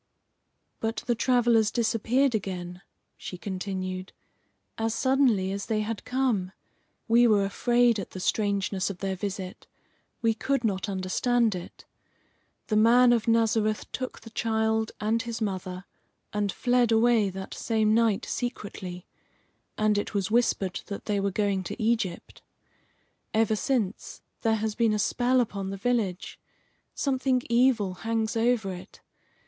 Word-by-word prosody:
"But 225 -1 -2
the 240 - +2
travellers 235 -2 +3
disappeared 240 +3 +1
again," 180 -3 -4 0.4
she 180 - -7
continued, 185 -1 -4 0.6
"as 225 0 -1
suddenly 255 -8 +2
as 200 0 -4
they 220 -2 0
had 215 0 -4
come. 245 -8 0 0.5
We 240 +1 +5
were 205 -3 +4
afraid 240 +2 +2
at 195 - -6
the 185 - -8
strangeness 200 -1 0
of 195 - -6
their 190 0 -2
visit. 190 -1 -6 0.6
We 225 -1 +3
could 270 +4 -1
not 200 -2 -1
understand 215 +5 +1
it. 180 -1 -9 0.8
The 215 - 0
man 240 +3 +6
of 230 -2 0
Nazareth 225 -2 +1
took 255 -1 -5
the 225 - -12
child 220 0 0
and 220 +2 +1
his 235 -2 -5
mother, 185 -3 -4 0.5
and 205 -1 0
fled 245 0 +2
away 225 -2 +4
that 190 0 -7
same 220 -2 +1
night 225 -3 +2
secretly, 195 -7 -5 0.7
and 215 -1 +2
it 205 - -5
was 195 0 -1
whispered 205 -6 +1
that 200 - -6
they 205 -2 0
were 200 0 0
going 200 -1 0
to - - -6
Egypt. 220 -6 -1 0.9
Ever 220 -1 +3
since, 215 -3 -2 0.2
there 225 -1 +2
has 220 0 -2
been 225 -1 +2
a - - +1
spell 250 +4 +2
upon 200 -5 -2
the 195 - -5
village; 200 -4 -1 0.6
something 260 -2 +1
evil 235 -5 +3
hangs 225 0 -1
over 225 -4 +1
it. 185 +2 -11
220 Hz, 140 wpm, -27 LUFS, 195-235 Hz, 0.9 s, man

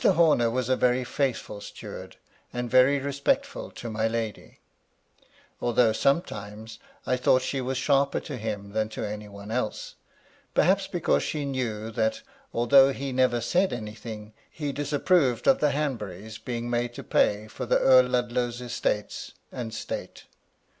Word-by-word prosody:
Horner 155 -8 +4
was 125 +1 -1
a 130 - +3
very 125 0 +2
faithful 125 -6 -2
steward, - - -9 0.4
and 120 -1 -4
very 130 +2 +6
respectful 140 - -1
to 120 - -7
my 110 0 0
lady; 115 -2 -4 1.0
although, 120 -2 +3
sometimes, 110 - -1 0.3
I 125 - +2
thought 130 0 +3
she 135 0 -2
was 130 +1 -2
sharper 140 +1 +2
to 145 - -6
him 105 -3 -4
than 110 +1 -1
to 110 - -4
any 105 0 -6
one 100 +1 -9
else; 115 -3 -2 0.6
perhaps - - +3
because 70 - +1
she 150 -2 -2
knew 115 -5 -3
that, 275 - -1 0.3
although 135 +3 +6
he 135 0 -4
never 125 -2 +2
said 180 - +2
any 110 -3 -5
thing, 110 -1 -9 0.2
he 145 -2 -4
disapproved 145 -1 +1
of 270 - +5
the 150 - +3
Hanburys 110 -8 -3
being 120 -1 -4
made 120 0 -1
to - - -7
pay 105 +1 +2
for - - -6
the - - +4
Earl 130 -1 +6
Ludlow's 120 -1 -1
estates 120 -4 -3 0.2
and 120 -3 -5
state. 110 - -6
120 Hz, 155 wpm, -27 LUFS, 110-135 Hz, 1.0 s, very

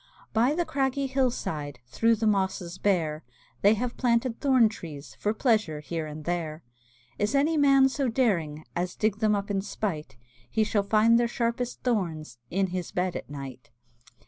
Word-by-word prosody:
By 245 +6 +3
the 345 0 0
craggy 275 -1 0
hill 265 -1 +2
side, 145 - -4
Through 225 - +2
the 220 +1 -2
mosses 190 -3 0
bare, 160 -6 0 0.4
They 205 +2 +5
have 240 +2 -3
planted 235 -1 +1
thorn 260 -5 +5
trees 160 -9 -8
For 210 - +1
pleasure 215 - +1
here 155 +2 -4
and 150 0 -8
there. 165 -2 -3 0.6
Is 210 +6 +1
any 295 +4 +3
man 275 -2 +5
so 270 0 -1
daring 175 - 0
As 180 +1 -2
dig 215 -1 0
them 215 -1 +3
up 200 0 -3
in 195 -1 0
spite, 155 - -4 0.3
He 220 - +2
shall 210 -1 +1
find 220 +3 +4
their 240 - +2
sharpest 235 +1 -2
thorns 160 - -2
In 190 0 0
his 180 -2 -3
bed 180 -1 -1
at - - -6
night. 135 -3 -8
205 Hz, 170 wpm, -27 LUFS, 165-240 Hz, 0.6 s, They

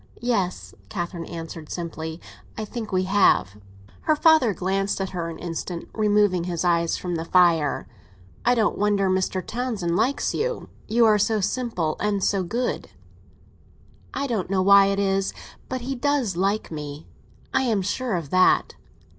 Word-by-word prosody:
"Yes," 200 -7 -1 0.2
Catherine 175 -3 -4
answered 165 -2 -7
simply; 160 -1 -5 0.4
"I 220 - -3
think 220 0 -6
we 185 0 +1
have." 185 - +3 0.4
Her 310 - +2
father 310 -7 +5
glanced 195 +2 -1
at 190 -1 -3
her 170 -3 -3
an 165 - -7
instant, 170 0 -5
removing 205 -4 +2
his 175 -1 -2
eyes 170 -1 +2
from 180 -1 -4
the 160 - -3
fire. 170 -5 +3 0.6
"I 245 +1 +4
don't 220 -3 +1
wonder 200 -2 +2
Mr. 185 -1 -1
Townsend 220 -8 -2
likes 260 +9 +1
you. - - -2 0.2
You 230 +1 +4
are 215 -1 +5
so 215 +1 +2
simple 195 -7 -1
and 205 -2 0
so 200 -2 +2
good." 235 +8 -2 1.2
"I 280 - -2
don't 220 -9 -2
know 190 -1 +1
why 200 0 +7
it 195 0 0
is—but 195 +6 -3
he 265 +3 -3
does 265 -6 0
like 195 +3 0
me. 150 -1 -6 0.5
I - - +3
am 225 -7 +1
sure 230 +3 -1
of 165 -5 -4
that." 185 0 +4
195 Hz, 155 wpm, -24 LUFS, 175-220 Hz, 1.2 s, why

